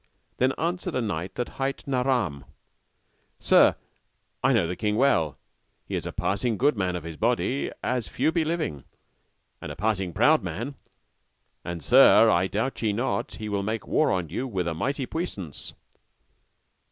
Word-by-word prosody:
Then 130 +2 +2
answered 175 +1 -2
a - - +1
knight 95 -4 -3
that 125 - -2
hight 135 +1 -2
Naram, 125 - 0 0.9
Sir, - - +5 0.7
I - - +4
know 115 -9 +3
the 90 +2 -3
king 105 +2 -1
well; 105 - +2 0.5
he - - -8
is - - -3
a - - -4
passing 110 +3 -1
good 140 +3 +3
man 95 -3 -1
of 90 - -5
his 80 -1 -7
body, 125 +3 0
as 125 -3 -1
few 160 - 0
be 165 -1 +1
living, 155 - -2 0.8
and - - -6
a - - -7
passing 95 -2 -1
proud - - +4
man, 115 - -4 0.9
and 85 -3 -5
Sir, 85 +6 +6
doubt 110 +7 -2
ye 110 -3 +1
not 120 +6 -2
he 110 - -6
will 100 -1 -1
make 110 +1 -3
war 155 - +2
on 90 -4 -1
you 125 - -3
with 95 -7 -2
a 85 - -1
mighty 135 - -2
puissance. 120 - -5
110 Hz, 165 wpm, -26 LUFS, 90-135 Hz, 0.9 s, Sir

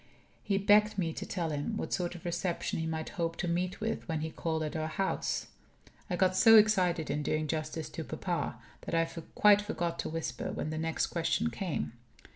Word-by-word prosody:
He 200 - 0
begged 210 +1 +4
me 165 -4 0
to - - -6
tell 170 -4 -2
him 150 +9 -2
what - - -3
sort 175 -1 -1
of 175 - -11
reception 175 0 -1
he 160 - -2
might 160 0 -3
hope 165 -2 -2
to 175 - -3
meet 180 +2 -1
with 225 +1 -3
when 160 -3 -1
he 160 +1 -3
called 160 -1 -2
at 155 - -4
our 155 0 -1
house. 190 +5 -1 0.6
I 180 - 0
got 185 +1 +3
so 225 +4 +8
excited 185 -8 +4
in 150 +1 -1
doing 155 +1 0
justice 155 +1 -3
to - - -5
papa - - -3 0.3
that - - -1
I 165 0 +3 0.3
quite 205 -1 +6
forgot 170 -5 -3
to - - -2
whisper 155 -7 -3
when 155 - -3
the 155 - -3
next 160 0 0
question 170 +7 0
came. 185 - -3
170 Hz, 205 wpm, -31 LUFS, 160-195 Hz, 0.6 s, so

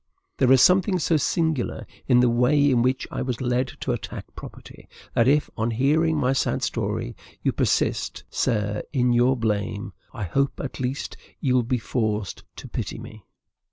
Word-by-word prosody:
There 130 -1 +3
is 130 -1 +7
something 185 +1 +4
so 165 0 +1
singular 160 -3 -1 0.2
in 125 -2 +5
the 125 - +4
way 140 +4 +3
in 120 -2 +3
which 130 +2 0
I - - -3
was 125 -2 -3
led 125 0 0
to - - -1
attack - - -5
property, - - -12 0.2
that 115 - +3
if, 145 +2 +3
on 110 +1 -1
hearing 150 +7 +2
my 130 -2 +2
sad 135 - 0
story, - - -2 0.3
you - - +2
persist, - - 0
sir, 105 -2 -1
in 125 -3 +2
your 125 +2 +3
blame, 105 -3 -2 0.2
I 115 -5 -6
hope 140 +10 0
at 135 - -5
least 130 +2 -3 0.2
you 130 - +1
will 125 - +4
be 125 +2 -1
forced 110 -4 -2
to - - -9
pity - - -4
me. 110 -2 -11
125 Hz, 175 wpm, -24 LUFS, 115-140 Hz, 0.3 s, is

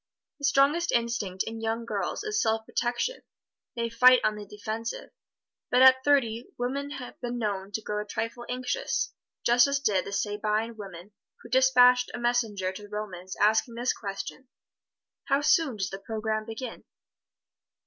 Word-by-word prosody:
The 285 - -2
strongest 280 +5 +3
instinct 230 -6 -1
in 225 0 -6
young 225 +1 -2
girls 205 - -3
is 430 +1 0
self 220 0 0
protection 240 - -2 0.5
they 235 -1 -1
fight 250 +2 +6
on 215 - +2
the 210 -1 -8
defensive. 215 +3 -5 0.6
But 250 +1 +5
at 260 0 +7
thirty, 245 -5 +2
women 275 +4 -2
have 270 -4 -8
been 245 -1 -3
known 200 -3 -3
to 220 - -3
grow 210 0 -2
a 210 - -8
trifle 230 +3 -4
anxious, 250 0 -2 0.3
just 240 +2 +6
as 280 0 0
did 205 -9 +1
the - - -6
Sabine 210 +3 -1
women 195 -2 -10 0.3
who - - -11
dispatched 250 -1 +5
a - - -5
messenger 225 -6 0
to 190 - -9
the 205 - -12
Romans 190 -3 -6
asking 220 +2 +3
this 240 +1 0
question, 205 +5 -7 0.8
"How 275 +1 +2
soon 300 -4 +3
does 190 -1 -2
the 195 - -6
program 215 +1 -3
begin?" 225 +1 -7
230 Hz, 160 wpm, -27 LUFS, 210-250 Hz, 0.8 s, at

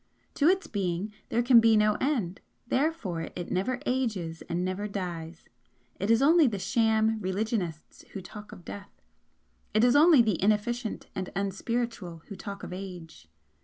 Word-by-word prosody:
To 290 - +2
its 380 +2 +3
Being 195 0 -2 0.2
there 235 - +1
can 240 -1 +7
be 225 -1 +5
no 210 0 +4
end 230 - -1 0.2
therefore 240 - -1
it 175 - -5
never 195 +8 0
ages 210 -11 -2
and 175 +1 -1
never 185 +3 -2
dies. 170 -5 -6 0.5
It 195 - -2
is 230 +3 +4
only 320 +1 +6
the 215 -4 -1
sham 220 +1 +2
religionists 190 -4 -3
who 195 - -5
talk 210 +2 -10
of 175 - -12
death, 200 +3 -9 0.8
it 215 - +4
is 245 +1 +5
only 300 -4 +7
the 215 -6 0
inefficient 215 +3 0
and 185 -1 -4
unspiritual 195 -3 -3
who 200 - -6
talk 200 +1 -8
of - - -6
age. 180 - -9
210 Hz, 160 wpm, -28 LUFS, 185-235 Hz, 0.8 s, can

